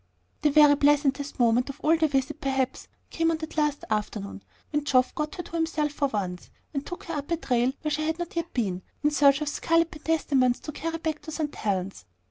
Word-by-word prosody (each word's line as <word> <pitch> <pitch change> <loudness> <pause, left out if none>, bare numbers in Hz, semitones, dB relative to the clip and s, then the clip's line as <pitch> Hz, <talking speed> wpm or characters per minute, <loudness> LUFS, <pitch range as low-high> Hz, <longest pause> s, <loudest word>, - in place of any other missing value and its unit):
The 300 - +4
very 295 0 +7
pleasantest 285 -1 +2
moment 240 +2 +3
of 275 - -7
the 320 +1 +3
visit 270 -2 -1
perhaps 265 -1 -1 0.2
came 330 0 +1
on 325 - +1
that 315 0 -7
last 300 -2 0
afternoon, 205 -1 -3 0.3
when 295 -1 0
Geoff 255 -3 +3
got 300 0 -3
her 355 - -5
to - - -14
himself 320 -3 0
for 290 -1 0
once, 190 -7 -4 0.2
and 275 -1 -2
took 355 - -7
her 335 - -6
up 290 -2 -4
a 335 - +1
trail 250 -4 +1
where 305 - -1
she 305 +1 0
had 320 0 -1
not 345 -1 -5
yet 335 0 -2
been, 190 -7 -1 0.2
in 295 - +3
search 280 -1 +4
of 300 - -2
scarlet 330 +2 +1
pentstemons 285 -6 +1
to 305 - -6
carry 330 +3 -3
back 315 -2 -3
to 315 - -8
St. 305 -2 -3
Helen's. 190 - -3
295 Hz, 215 wpm, -27 LUFS, 255-315 Hz, 0.3 s, very